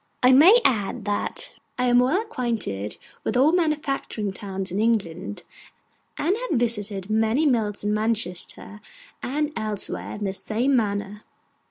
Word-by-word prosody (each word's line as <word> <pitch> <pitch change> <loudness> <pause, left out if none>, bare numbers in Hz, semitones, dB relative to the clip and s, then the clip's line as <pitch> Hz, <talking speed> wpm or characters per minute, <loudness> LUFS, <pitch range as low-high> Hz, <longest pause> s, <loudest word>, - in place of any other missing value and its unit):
I 250 - +7
may 340 - +8
add 215 -2 +1
that 205 0 -2 0.2
I 250 - +1
am 245 0 +5
well 265 +10 +3
acquainted 230 - -3 0.3
with - - -1
our 275 +5 +5
manufacturing 295 - -1
towns 195 -2 -5
in 190 - -2
England, 205 -4 -1 0.7
and 345 +7 +1
have 430 - -1
visited 210 -4 -1
many 220 +7 +2
mills 220 -8 +1
in 210 0 0
Manchester 210 -1 -2 0.4
and 300 +3 -2
elsewhere 215 -2 -3
in 210 - -6
the 195 -1 -1
same 235 +7 +1
manner. 205 -2 -1
220 Hz, 140 wpm, -24 LUFS, 205-265 Hz, 0.7 s, may